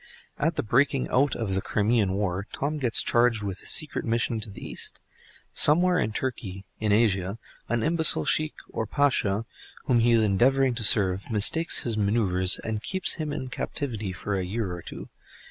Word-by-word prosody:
At 160 +2 0
the - - -1
breaking 130 +4 +1
out 140 +3 +2
of 110 -5 -3
the 95 - -1
Crimean 105 -2 +1
War, 100 0 -2
Tom 150 +2 -3
gets 120 -5 +4
charged 120 -2 +2
with 95 -2 -5
a - - -9
secret 155 - -2
mission 115 0 -1
to 110 - -6
the 100 - -10
East. - - -5 0.5
Somewhere 180 +4 +5
in 110 - -1
Turkey, 105 -6 -5
in 110 -1 0
Asia, 100 -2 +1 0.3
an 115 -1 0
imbecile 160 - +4
Sheikh 155 -1 0 0.2
or 110 - -3
Pasha 115 -6 +1 0.4
whom 125 -3 +2
he 120 +1 +3
is 115 -1 +4
endeavoring 130 +6 +2
to 120 -1 -4
serve, 100 -2 +1
mistakes 115 +10 +2
his 115 -3 -2
manœuvres, 100 -3 +2
and 110 -1 -3
keeps 190 +8 -1
him 150 -1 -3
in 130 -3 -5
captivity 115 -8 -4
for 100 +2 -4
a 95 - -2
year 95 0 -3
or 90 - -7
two. - - -9
115 Hz, 180 wpm, -26 LUFS, 100-130 Hz, 0.5 s, Somewhere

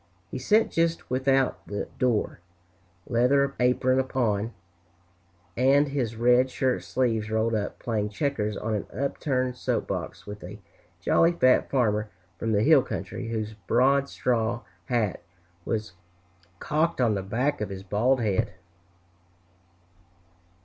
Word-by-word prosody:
He - - -4
sat 215 - +3
just 165 -3 0
without 135 0 +1
the 100 0 -4
door, 125 -9 0 0.7
leather 140 +4 +2
apron 125 +1 +3 0.2
on, 110 -3 +1 1.0
and 135 +3 +4
his 125 -5 -2
red 125 +3 +4
shirt 130 0 0
sleeves 115 -4 0
rolled 110 +1 +1
up, 105 -2 -2
playing 105 -3 -2
checkers 105 -3 -2
on 110 0 -2
an 105 - -2
upturned 130 -2 -1
soap - - -1
box, - - -4
with 105 0 -8
a 95 +4 -8 0.4
jolly 165 - +3
fat 130 -6 +3
farmer 105 -5 +1 0.3
from 115 - -1
the 105 0 +2
hill - - +6
country, - - -5
whose 110 -1 -3
broad 135 +3 +3
straw 115 -1 0 0.2
hat 110 -4 -1 0.4
was 110 -4 -3 0.6
cocked 155 - 0
on 120 -4 +3
the 100 - -1
back 125 +9 -1
of 105 - -2
his 95 0 -7
bald 120 +7 +1
head. 105 -1 0
120 Hz, 130 wpm, -26 LUFS, 105-130 Hz, 1.0 s, hill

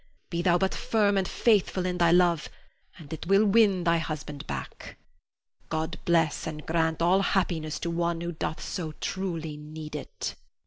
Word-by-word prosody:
Be 170 -1 0
thou 175 0 +4
but 190 +1 0
firm 205 -3 +2
and 190 -2 +1
faithful 200 -5 +2
in 180 -1 -2
thy 170 -1 +5
love 175 -2 +3 0.5
and 160 -3 -9
it 160 - -6
will 195 +3 +5
win 200 -3 +4
thy 170 0 +3
husband 150 -3 -5
back. 70 -2 -7 0.7
God 160 +1 -2
bless 165 -3 +2
and 155 -1 -6
grant 160 0 +1
all 185 +3 +4
happiness 170 -6 0
to 170 - -2
one 170 0 0
who 170 0 -3
doth 160 -1 -4
so 160 -4 -4
truly 165 -4 -4
need 150 0 -8
it. 150 - -5
170 Hz, 170 wpm, -27 LUFS, 160-185 Hz, 0.7 s, thy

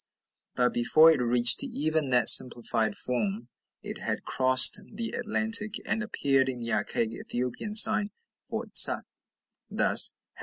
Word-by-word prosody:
But 125 0 -2
before 155 +7 +1
it 155 - -3
reached 120 0 +3
even 155 -1 -5
that 125 -2 -1
simplified 115 -3 +3
form 115 -1 -6 0.3
it - - -11
had - - -7
crossed 130 +9 +2
the 230 -1 -9
Atlantic, 220 -2 -2
and 225 - -5
appeared 135 - -3
in 125 -2 -9
the 115 0 -7
archaic 115 -1 -5
Ethiopian 125 - -9
sign 220 -1 +5 0.3
for - - -9
tsa, - - +6 0.7
thus, - - +4
### - - -68
130 Hz, 140 wpm, -24 LUFS, -, 0.7 s, tsa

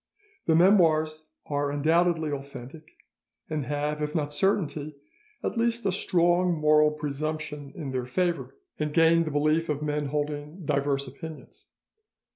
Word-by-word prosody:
The 160 - +4
'Memoires' 160 -4 +4 0.2
are 145 -1 -1
undoubtedly 160 +2 +2
authentic, 140 +2 -8 0.6
and 150 -5 -2
have, 150 +1 -2
if 150 +1 -3
not 150 -2 -1
certainty, 155 -5 0 0.5
at 230 - -2
least 235 0 0
a 195 - +3
strong 175 -1 +2
moral 150 0 +5
presumption 150 -1 -4
in 145 -6 -5
their 130 -1 -3
favour, 175 +5 -1 0.2
and 150 -1 -1
gained 165 0 +5
the - - -2
belief 155 +3 +1
of 150 0 -1
men 150 -1 -1
holding 150 +3 -4
diverse 140 -1 0
opinions. 155 +4 -10
150 Hz, 135 wpm, -27 LUFS, 145-165 Hz, 0.6 s, moral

